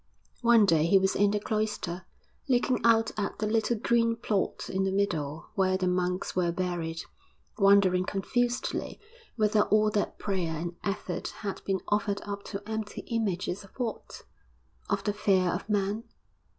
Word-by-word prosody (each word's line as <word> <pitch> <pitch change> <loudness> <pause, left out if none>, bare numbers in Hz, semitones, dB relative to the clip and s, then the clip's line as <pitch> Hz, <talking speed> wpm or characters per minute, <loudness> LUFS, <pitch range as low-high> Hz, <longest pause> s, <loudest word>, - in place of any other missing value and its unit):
One 235 -3 +6
day 165 -4 +3
he 195 - +6
was 190 0 +2
in 205 0 +4
the 210 +1 0
cloister, 210 -4 -2 0.4
looking 250 0 +2
out 225 -1 +4
at 200 - -2
the 215 - -1
little 220 +2 +1
green 230 +1 +2
plot 215 -4 -2
in 190 0 -1
the 190 - 0
middle 160 -6 -2
where 185 -1 +2
the 185 -1 0
monks 180 0 -1
were 175 -2 +2
buried, 170 -2 -3 0.6
wondering 195 -2 +5
confusedly 240 +6 -1 0.4
whether 215 -2 +3
all 215 0 +3
that 210 -1 -1
prayer 180 -5 -2
and 170 +2 -4
effort 190 -3 -3
had 200 -2 -4
been 195 -1 0
offered 205 -1 +1
up 200 -1 -5
to 200 0 -6
empty 220 -1 -4
images 205 -4 -1
of 195 - -18
what 240 -3 -5 0.7
of 200 -2 0
the 205 - 0
fear 190 -3 +2
of 180 +5 -3
Man? 205 +1 0
200 Hz, 160 wpm, -28 LUFS, 185-215 Hz, 0.7 s, One